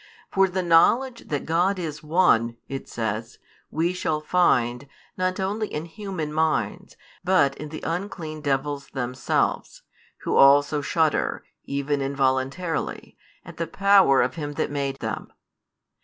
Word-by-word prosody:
For 195 0 +4
the 185 0 -2
knowledge 235 +9 +3
that 145 -2 -3
God 175 +5 +1
is 155 -4 -5
One, 150 -8 +2
it 135 0 -6
says, 115 0 -4 0.3
we 170 +3 0
shall 160 -4 -1
find, 140 -6 +1 0.3
not 185 +1 -1
only 205 +3 -1
in 155 -3 -5
human 170 -4 -5
minds, 160 0 -1 0.3
but 180 -7 +3
in 150 +1 -6
the 155 - -8
unclean 165 -3 -4
devils 140 0 -1
themselves; 125 0 -2 0.4
who - - -1
also 145 +2 +5
shudder, 155 +1 0 0.2
even 140 +1 -1
involuntarily, 135 +4 -1 0.3
at - - -11
the 165 - -2
power 195 -7 +5
of 125 - -1
Him 145 -3 -5
that - - -2
made 140 -1 -2
them. 110 -2 -4
155 Hz, 135 wpm, -24 LUFS, 135-180 Hz, 0.4 s, also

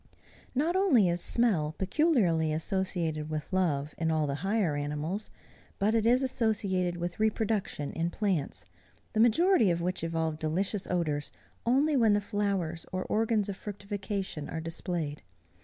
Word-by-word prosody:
Not 315 +7 +1
only 335 - +4
is 175 0 +1
smell 175 -11 +2
peculiarly 190 - +2
associated 160 -2 -1
with 155 +4 -4
love, 155 -6 0
in 165 -1 +1
all 155 -1 +1
the 140 - -1
higher 195 -5 +1
animals, 150 +8 -3 0.5
but 210 +3 +2
it 225 -1 +2
is 250 +3 +4
associated 200 -8 0
with 175 +1 -4
reproduction 215 -8 0
in 165 +1 -1
plants, 185 -7 -1 0.5
the 220 - 0
majority 240 - +5
of 170 -1 +1
which 180 0 -2
evolve 160 -1 -1
delicious 185 +6 -1
odors 155 -5 -1 0.4
only 285 +5 +3
when 225 -5 +4
the 205 - +3
flowers 200 -5 -2
or 185 0 -2
organs 220 -1 +1
of 200 - -3
fructification 200 -5 -5
are 160 - -3
displayed. 165 -2 -3
185 Hz, 145 wpm, -29 LUFS, 160-220 Hz, 0.5 s, majority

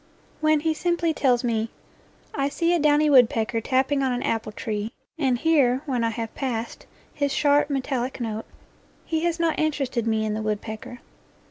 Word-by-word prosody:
When 310 -1 +3
he 320 0 +1
simply 340 0 0
tells 255 -5 +2
me, 225 -2 0 0.3
" - - -32 0.3
I 275 -1 0
see 335 +4 +1
a 345 - +2
downy 300 0 +4
wood 255 -5 +7
pecker 225 0 -1
tapping 265 +3 +1
on 265 -1 +1
an 245 0 -2
apple 220 -1 -1
tree 215 +1 -4 0.3
and 260 -5 +2
hear 275 -3 +3
when 255 -5 -1
I 230 - +2
have 225 0 -5
passed 235 -4 -4 0.3
his 285 -1 -1
sharp, 290 +1 +3
metallic 265 -2 -2
note," 220 -2 -3 0.6
he 320 - -1
has 340 0 0
not 335 -1 +1
interested 275 -7 -1
me 220 -1 +1
in 215 - -1
the 215 - -2
woodpecker. 220 +3 -5
260 Hz, 180 wpm, -24 LUFS, 230-295 Hz, 0.6 s, wood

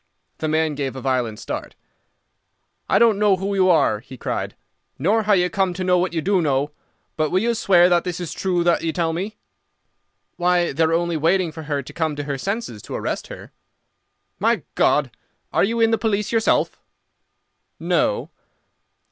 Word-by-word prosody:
The 155 - -2
man 155 0 +1
gave 140 -2 -3
a - - -5
violent 125 -4 -1
start. - - -6 1.1
"I - - +4
don't 225 -4 +4
know 205 -2 +4
who 195 +2 -3
you 190 -1 +3
are," 110 -11 +3
he 125 +3 -12
cried, - - -3 0.4
"nor 205 +10 +2
how 210 -1 +2
you 180 -2 +3
come 190 -2 0
to 185 - -3
know 180 -1 +3
what 180 +1 0
you 165 -2 -2
do 195 -2 +2
know, 145 -1 0 0.5
but 155 -1 +1
will 185 - +1
you 235 +1 +1
swear 180 -5 +4
that 175 -1 +3
this 180 -1 -4
is 175 -3 -5
true 180 -2 0
that 170 -1 +2
you 165 - -1
tell 165 -1 0
me?" 195 +6 -4 1.0
"Why, 175 0 +2
they 150 - -3
are 160 - 0
only 170 0 0
waiting 170 +2 +2
for 160 - -8
her 145 -1 -1
to - - -11
come 160 -3 -1
to 145 - -4
her 140 -1 -4
senses 195 - -4
to - - -7
arrest - - -3
her." - - -10 0.9
"My - - +1
God! - - +2 0.4
Are - - +3
you 230 +4 0
in 225 0 +4
the 225 - +2
police 210 -2 0
yourself?" 225 -1 +1 1.0
"No." - - 0
175 Hz, 190 wpm, -22 LUFS, 155-195 Hz, 1.1 s, I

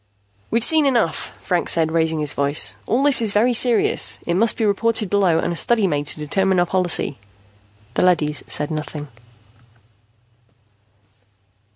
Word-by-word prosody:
"We've 230 0 0
seen 315 -1 +2
enough," 235 -11 -1
Franks 180 -2 0
said, 160 -1 0
raising 160 -1 0
his 145 -3 -3
voice. 140 +1 +1
"All 250 +5 0
this 285 -4 +3
is 215 -3 +1
very 235 +4 +2
serious. 240 -1 +2
It 170 - -1
must 220 +6 +1
be 225 - 0
reported 215 0 -1
below 195 -5 +2
and 170 - -2
a - - -6
study 225 +4 +1
made 145 -5 -2
to 155 - -4
determine 190 +5 0
our 175 - +2
policy." 175 -6 0 0.7
The - - -1
leady 160 -5 +2
said 150 +1 0
nothing. 150 -1 -6
180 Hz, 155 wpm, -20 LUFS, 155-225 Hz, 0.7 s, this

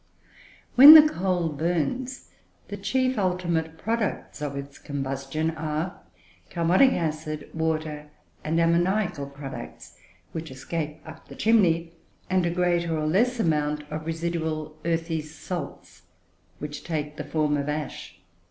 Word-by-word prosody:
When 285 +5 +12
the 310 -1 +10
coal 180 - -1
burns, 175 - -2 0.4
the - - -4
chief 260 -2 0
ultimate 170 -4 -1
products 220 -6 -3
of 145 -2 -3
its 140 0 -8
combustion 140 +3 -3
are 155 +2 -4 0.5
carbonic 180 +10 +4
acid, 155 -2 -3
water, 155 -2 -2 0.3
and 160 +2 0
ammoniacal 170 -2 +1
products, 140 -1 -9 0.3
which 160 -1 -6
escape 150 +3 -5
up - - -12
the - - -11
chimney; 170 -7 +3 0.4
and 185 -2 +2
a - - +1
greater 175 -2 +1
or 155 - -1
less 235 +10 +2
amount 150 -5 0
of 155 +1 -5
residual 160 -2 -3
earthy 165 -1 -1
salts, 155 +1 -7 0.6
which 150 0 -7
take 150 -2 -4
the - - -4
form 150 -2 0
of 145 0 -2
ash. 150 0 -5
160 Hz, 125 wpm, -26 LUFS, 150-180 Hz, 0.6 s, When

